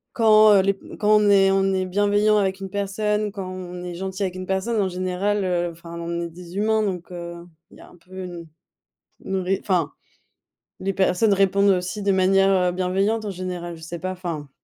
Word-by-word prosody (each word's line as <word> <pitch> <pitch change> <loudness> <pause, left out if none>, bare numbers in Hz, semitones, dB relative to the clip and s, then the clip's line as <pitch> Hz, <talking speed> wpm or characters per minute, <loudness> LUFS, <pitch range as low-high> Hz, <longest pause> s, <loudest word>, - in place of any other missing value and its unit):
quand, 215 -2 +6
heu, 195 - +6
les 200 0 +2
p 195 - -13
quand 210 - 0
on 210 -1 +3
est 195 -1 +5
on 195 0 +2
est 185 0 0
bienveillant 205 +2 +2
avec 190 -1 0
une 195 - -6
personne, 210 +1 -1
quand 195 -2 -6
on 180 -1 -7
est 180 -1 -5
gentil 190 +2 -4
avec 185 -1 -2
une 185 0 -6
personne, 200 +3 0
en 190 - 0
général, 185 +3 -1
heu, 175 -1 0
enfin 170 0 -10
on 170 0 -3
est 170 - -5
des 175 +2 -10
humains, 220 +1 +2
donc 180 -4 -4
heu, 170 -1 -8 0.2
il - - -17
y - - -15
a - - -14
un - - -18
peu 185 +2 -10
une 175 -2 -8 0.8
une 190 - -2
ré 190 +1 0
enfin 180 -6 0 0.9
les 195 +1 -2
personnes 195 +2 +2
répondent 200 +1 +3
aussi 185 +1 0
de 200 - +1
manière, 195 +1 +3 0.2
heu, - - -1
bienveillante 195 +5 0
en 205 - -3
général, 180 -2 -5
je 160 - -14
sais 170 +1 -6
pas, 185 - -3
enfin. 165 -6 -6
190 Hz, 215 wpm, -23 LUFS, 180-200 Hz, 0.9 s, quand